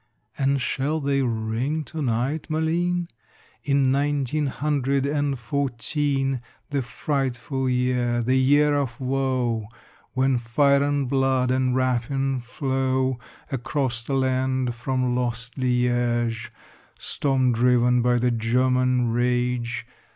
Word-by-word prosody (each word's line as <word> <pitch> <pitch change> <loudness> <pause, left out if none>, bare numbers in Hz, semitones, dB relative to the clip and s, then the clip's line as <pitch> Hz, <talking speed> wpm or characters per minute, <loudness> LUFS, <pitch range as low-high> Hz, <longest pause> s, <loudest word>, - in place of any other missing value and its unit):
And 140 0 +1
shall 140 +4 -1
they 140 -1 +1
ring 120 +5 -1
to 160 +2 -6
night, 130 +4 -1
Malines? 170 +3 0 0.6
In 140 -2 +2
nineteen 145 +1 0
hundred 140 0 0
and 145 -1 0
fourteen, 135 +1 -1 0.3
The 140 -1 0
frightful 130 +1 -2
year, 125 -1 +1
the 130 +3 +1
year 145 +3 +4
of 140 -3 -1
woe, 130 -4 -1 0.5
When 130 -1 +2
fire 140 +4 +3
and 145 -1 0
blood 130 -1 +1
and 130 -1 +1
rapine 130 +1 0
flow 130 0 -1 0.3
Across 125 -2 -2
the 135 - -1
land 130 -1 0
from 125 +1 -1
lost 120 0 -3
Liége, 120 -2 0 0.5
Storm 135 -3 0
driven 125 +1 +3
by 120 0 +3
the 125 +1 +2
German 125 +1 +2
rage? 120 0 0
130 Hz, 115 wpm, -24 LUFS, 125-140 Hz, 0.6 s, year